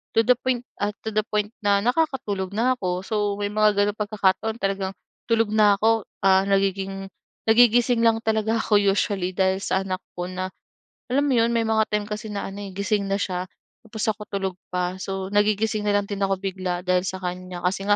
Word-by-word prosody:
To -, -, +5 dB
the 250 Hz, -, +6 dB
point 255 Hz, -2 st, -1 dB, 0.2 s
ah, 205 Hz, +1 st, -1 dB
to 220 Hz, -, -3 dB
the 215 Hz, 0 st, +1 dB
point, 210 Hz, 0 st, -1 dB
na 200 Hz, -1 st, +3 dB
nakakatulog 245 Hz, -, 0 dB
na 245 Hz, +4 st, +3 dB
ako. 180 Hz, -4 st, -2 dB
So, 220 Hz, -, -3 dB, 0.2 s
may 205 Hz, 0 st, -2 dB
mga 215 Hz, 0 st, +3 dB
gano'ng 205 Hz, +1 st, +1 dB
pagkakataon 210 Hz, +1 st, 0 dB
talagang 195 Hz, -1 st, -1 dB, 0.4 s
tulog 225 Hz, -2 st, +3 dB
na 210 Hz, -1 st, +5 dB
ako. 220 Hz, +1 st, +2 dB, 0.2 s
Ah, 190 Hz, 0 st, +6 dB
nagiging 195 Hz, 0 st, 0 dB, 0.4 s
nagigising 240 Hz, +1 st, +5 dB
lang 230 Hz, -1 st, +4 dB
talaga 220 Hz, 0 st, +1 dB
ako 210 Hz, -2 st, +3 dB
usually, 195 Hz, -2 st, +1 dB
dahil 190 Hz, +1 st, +1 dB
sa 195 Hz, 0 st, 0 dB
anak 185 Hz, -1 st, -3 dB, 0.2 s
ko. 175 Hz, -, -2 dB
Na, 185 Hz, +1 st, -4 dB, 0.6 s
alam 265 Hz, +4 st, +1 dB
mo 290 Hz, -, +1 dB
yun, 230 Hz, -, +4 dB
may 230 Hz, -, +2 dB
mga 220 Hz, -1 st, +2 dB
time 210 Hz, 0 st, -1 dB
kasi 210 Hz, +1 st, -6 dB
na 205 Hz, -1 st, -4 dB
ano, 200 Hz, -, -8 dB
eh, 195 Hz, -2 st, -7 dB
gising 200 Hz, 0 st, 0 dB
na 195 Hz, -, 0 dB
siya, 185 Hz, -2 st, -2 dB, 0.4 s
tapos, 220 Hz, -1 st, -5 dB
ako 215 Hz, -, -11 dB
tulog 195 Hz, -2 st, -3 dB
pa. 180 Hz, 0 st, -2 dB
So, 190 Hz, 0 st, -4 dB
nagigising 210 Hz, +1 st, +1 dB
na 205 Hz, -, +3 dB
lang 205 Hz, -, +2 dB
din 200 Hz, 0 st, -5 dB
ako 195 Hz, -1 st, +1 dB
bigla 185 Hz, -2 st, -3 dB
dahil 180 Hz, 0 st, +1 dB
sa 190 Hz, 0 st, -5 dB
kanya. 180 Hz, -1 st, -5 dB
Kasi 195 Hz, +2 st, -1 dB
nga, 205 Hz, -, +5 dB
205 Hz, 205 wpm, -24 LUFS, 190-220 Hz, 0.6 s, the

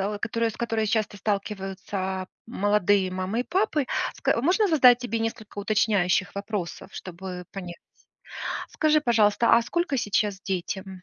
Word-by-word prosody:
о, -, -, -7 dB
которой, 230 Hz, +1 st, 0 dB
с -, -, -13 dB
которой 225 Hz, -2 st, -1 dB
часто 215 Hz, -2 st, 0 dB
сталкиваются 195 Hz, -2 st, -3 dB, 0.2 s
молодые 205 Hz, -3 st, +2 dB
мамы 185 Hz, +6 st, -1 dB
и -, -, -5 dB
папы. 355 Hz, -7 st, 0 dB, 0.3 s
Ска 230 Hz, -, +1 dB
можно 375 Hz, -, +3 dB
задать 255 Hz, -7 st, +6 dB
тебе 230 Hz, -2 st, -2 dB
несколько 225 Hz, -2 st, -4 dB
уточняющих 200 Hz, -2 st, +1 dB
вопросов, 200 Hz, -3 st, -4 dB
чтобы 180 Hz, 0 st, -7 dB
понять? 180 Hz, -3 st, -7 dB, 0.9 s
Скажи, 305 Hz, 0 st, +2 dB
пожалуйста, 230 Hz, -3 st, +4 dB
а 235 Hz, -, +3 dB
сколько 345 Hz, +2 st, -1 dB
сейчас 205 Hz, -3 st, 0 dB
детям? 190 Hz, 0 st, -4 dB
205 Hz, 135 wpm, -26 LUFS, 190-235 Hz, 0.9 s, задать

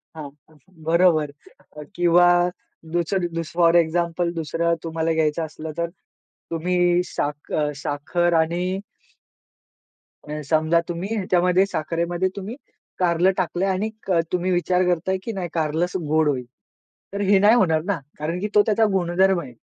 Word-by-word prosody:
हां, 150 Hz, -3 st, -7 dB, 0.5 s
बरोबर 165 Hz, -3 st, +3 dB, 0.6 s
किंवा 175 Hz, 0 st, +5 dB, 0.7 s
दुसर 175 Hz, +1 st, 0 dB
दुस 165 Hz, 0 st, -4 dB
फोर 170 Hz, 0 st, +4 dB
एक्झाम्पल 170 Hz, +1 st, +1 dB
दुसरं 170 Hz, +1 st, -1 dB
तुम्हाला 165 Hz, 0 st, -1 dB
घ्यायचं 160 Hz, 0 st, 0 dB
असलं, 155 Hz, 0 st, -8 dB
तर 170 Hz, 0 st, -1 dB, 0.6 s
तुम्ही 175 Hz, +1 st, +1 dB
साख 145 Hz, 0 st, -4 dB
अ, 150 Hz, -1 st, +1 dB
साखर 155 Hz, +5 st, -1 dB
आणि 180 Hz, +4 st, -2 dB, 1.5 s
अ, 150 Hz, 0 st, -5 dB
समजा 160 Hz, +1 st, +3 dB
तुम्ही 180 Hz, +6 st, -3 dB
ह्याच्यामध्ये 180 Hz, -1 st, +2 dB
साखरेमध्ये 170 Hz, +1 st, -2 dB
तुम्ही 200 Hz, +4 st, -6 dB, 0.4 s
कारलं 175 Hz, +1 st, +3 dB
टाकलंय 185 Hz, +1 st, -1 dB
आणि 190 Hz, +3 st, -1 dB, 0.4 s
तुम्ही 180 Hz, +1 st, 0 dB
विचार 180 Hz, +1 st, +1 dB
करताय, 180 Hz, +2 st, 0 dB
की 230 Hz, -, -4 dB
नाही 190 Hz, -4 st, -4 dB
कारलंच 165 Hz, +2 st, -1 dB
गोड 155 Hz, 0 st, +2 dB
होईल. 130 Hz, -3 st, -2 dB, 0.7 s
तर 200 Hz, -, -3 dB
हे 200 Hz, 0 st, +4 dB
नाही 210 Hz, +4 st, +6 dB
होणार 160 Hz, -8 st, +3 dB
ना, 195 Hz, -2 st, -1 dB, 0.2 s
कारण 165 Hz, +4 st, -3 dB
की 205 Hz, -, -2 dB
तो 210 Hz, -, +8 dB
त्याचा 220 Hz, 0 st, +3 dB
गुणधर्म 190 Hz, 0 st, +2 dB
आहे. 130 Hz, -5 st, -10 dB
175 Hz, 135 wpm, -22 LUFS, 160-185 Hz, 1.5 s, तो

